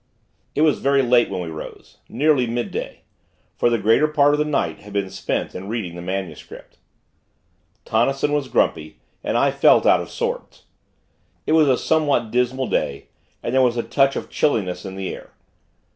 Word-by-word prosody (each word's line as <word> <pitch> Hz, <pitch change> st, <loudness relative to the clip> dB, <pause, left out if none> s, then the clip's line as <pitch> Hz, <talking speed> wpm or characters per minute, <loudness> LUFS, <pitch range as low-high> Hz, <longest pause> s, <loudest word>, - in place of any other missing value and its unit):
It 150 Hz, -, +1 dB
was 155 Hz, -2 st, +3 dB
very 140 Hz, 0 st, +2 dB
late 120 Hz, -1 st, +3 dB
when 95 Hz, -2 st, -3 dB
we 85 Hz, -, -5 dB
rose 80 Hz, -, -10 dB
nearly 135 Hz, 0 st, +2 dB
midday; 120 Hz, +1 st, -4 dB, 0.5 s
for -, -, +2 dB
the 120 Hz, -, +1 dB
greater 115 Hz, +8 st, +3 dB
part 145 Hz, -1 st, +3 dB
of 150 Hz, -, +1 dB
the 150 Hz, -, +1 dB
night 150 Hz, -2 st, -1 dB
had 105 Hz, 0 st, -13 dB
been 100 Hz, -2 st, -2 dB
spent -, -, -3 dB
in 95 Hz, +2 st, -7 dB
reading 110 Hz, -7 st, -4 dB
the 85 Hz, -, -8 dB
MS. 95 Hz, -3 st, -4 dB, 1.4 s
Tonnison 135 Hz, +6 st, +1 dB
was 145 Hz, -2 st, 0 dB
grumpy, 80 Hz, -10 st, 0 dB, 0.3 s
and -, -, 0 dB
I -, -, +3 dB
felt -, -, +4 dB
out -, -, +5 dB
of -, -, -8 dB
sorts. -, -, -5 dB, 0.8 s
It -, -, -1 dB
was 155 Hz, -2 st, +5 dB
a 130 Hz, -2 st, +3 dB
somewhat 145 Hz, -8 st, +1 dB
dismal 125 Hz, +2 st, 0 dB
day, -, -, -2 dB, 0.3 s
and 120 Hz, -, -3 dB
there 130 Hz, -, +4 dB
was 120 Hz, -2 st, +2 dB
a 120 Hz, -, 0 dB
touch 135 Hz, -1 st, +2 dB
of -, -, -6 dB
chilliness 95 Hz, -11 st, 0 dB
in 95 Hz, 0 st, -7 dB
the 95 Hz, -1 st, -4 dB
air. -, -, -12 dB
120 Hz, 180 wpm, -21 LUFS, 100-140 Hz, 1.4 s, out